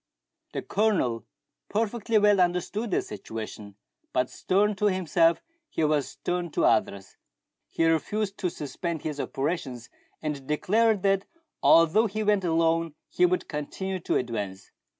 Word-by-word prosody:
The - - -3
Colonel 150 - 0 0.4
perfectly 225 +1 0
well 205 -1 +5
understood 180 +6 0
the - - +1
situation; 105 -1 -8 0.4
but 125 0 +1
stern 205 +3 +1
to 210 - 0
himself, 170 -3 +2 0.3
he 160 - -1
was 150 -2 +2
stern 175 -1 -3
to - - +2
others. 95 -1 +1 0.5
He 165 - 0
refused 195 +6 0
to 185 -4 0
suspend 165 +1 -5
his 150 -2 -4
operations, 135 -5 -3 0.3
and 145 -4 -4
declared 210 +7 +2
that 195 0 +2 0.4
although 165 +8 +5
he 215 +2 -3
went 205 -2 +2
alone, 165 -1 +1
he 180 - +3
would 180 +1 -1
continue 185 +6 -4
to - - -1
advance. 105 -6 -3
170 Hz, 135 wpm, -27 LUFS, 145-200 Hz, 0.5 s, well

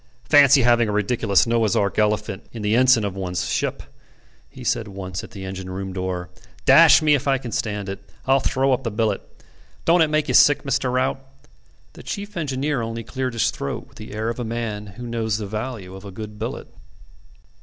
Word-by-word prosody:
"Fancy 140 -2 +6
having 120 -2 +4
a - - 0
ridiculous 105 -1 +2
Noah's 115 -3 +1
Ark 100 +1 +1
elephant 105 -2 -1
in 115 -3 -7
the 105 +1 +2
ensign 125 -3 +5
of 100 -2 -4
one's 90 -2 -3
ship," - - -2 0.7
he 130 -2 -11
said 115 -2 0
once 95 -2 -6
at - - -10
the 95 -2 -8
engine 95 -1 -6
room 95 0 -5
door. 90 -1 -4 0.3
"Dash - - +7
me 150 -1 +4
if 140 -1 0
I 135 -1 +3
can 125 -3 -7
stand 105 -2 -2
it: 95 0 -5 0.3
I'll 135 +1 +4
throw 135 +1 +1
up 130 - 0
the 115 - -1
billet. 105 -2 -1 0.6
Don't 170 +1 +4
it 160 - +4
make 155 0 +1
you - - -1
sick, 145 - +6
Mr. 135 -2 0
Rout?" 130 +1 0 0.7
The - - -12
chief 205 +1 -6
engineer 145 -4 -1
only 115 0 -4
cleared 130 +2 -3
his 115 - +1
throat 70 - -5
with - - -19
the 110 -1 -9
air 110 +2 -2
of 115 - -4
a - - -2
man 110 -3 -4
who 120 - -7
knows 115 -3 -1
the 110 - -5
value 105 -2 -5
of 95 - -11
a 100 - -8
good 105 +2 -8
billet. 110 - -5
115 Hz, 210 wpm, -22 LUFS, 100-130 Hz, 0.7 s, Dash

